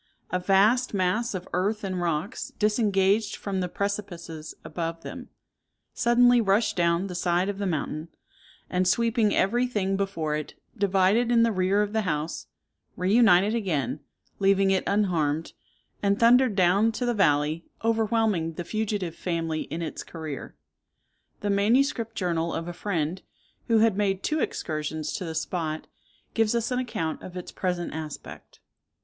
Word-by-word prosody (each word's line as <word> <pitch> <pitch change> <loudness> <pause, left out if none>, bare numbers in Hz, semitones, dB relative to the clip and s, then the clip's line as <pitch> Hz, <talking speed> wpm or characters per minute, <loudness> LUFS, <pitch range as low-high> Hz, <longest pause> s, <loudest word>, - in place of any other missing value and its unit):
A 180 - +1
vast 205 +6 +3
mass 200 +5 0
of 185 -1 -5
earth 205 +4 0
and 185 -2 -2
rocks, 170 +7 -2
disengaged 210 -1 +2
from 195 -2 -3
the 180 -1 -2
precipices 175 -6 -4
above 165 +1 -4
them, - - -8 0.6
suddenly 245 0 +4
rushed 205 +1 +2
down 170 +1 +2
the 190 - -5
side 175 +2 +1
of 200 -1 -4
the 200 - -1
mountain, 155 -1 -3 0.6
and 180 0 0
sweeping 225 +1 +2
every 240 +6 +2
thing 195 -5 -1
before 180 -6 -1
it, 150 -1 -5 0.2
divided 200 +4 +2
in 230 -1 +5
the 230 - +3
rear 195 +1 +2
of 210 0 -4
the 220 - +2
house, 155 -4 -3 0.5
reunited 200 +1 +4
again, 170 - -1 0.4
leaving 195 0 +3
it 190 - +2
unharmed, 165 -7 0 0.5
and 200 0 +1
thundered 240 -1 +5
down 195 +4 +4
to 225 +3 -2
the 240 - +1
valley, 155 -4 +2 0.2
overwhelming 220 -6 +1
the 175 - -5
fugitive 205 -3 -2
family 165 -3 -2
in 170 +1 -5
its 160 - -5
career. 155 -5 -7 0.9
The 205 - 0
manuscript 230 +3 +2
journal 170 -3 -1
of 165 - -4
a 175 - -4
friend, 175 -2 -2 0.5
who 230 -2 +4
had 220 -2 +4
made 195 -2 0
two 310 +1 0
excursions 155 - -3
to 180 - -4
the 160 -1 -5
spot, 160 -1 -3 0.5
gives 225 0 +2
us 235 +1 -1
an 250 - +1
account 165 -11 -3
of 185 0 -8
its 180 - -7
present 180 -2 -2
aspect. 155 -2 -8
195 Hz, 155 wpm, -26 LUFS, 170-215 Hz, 0.9 s, in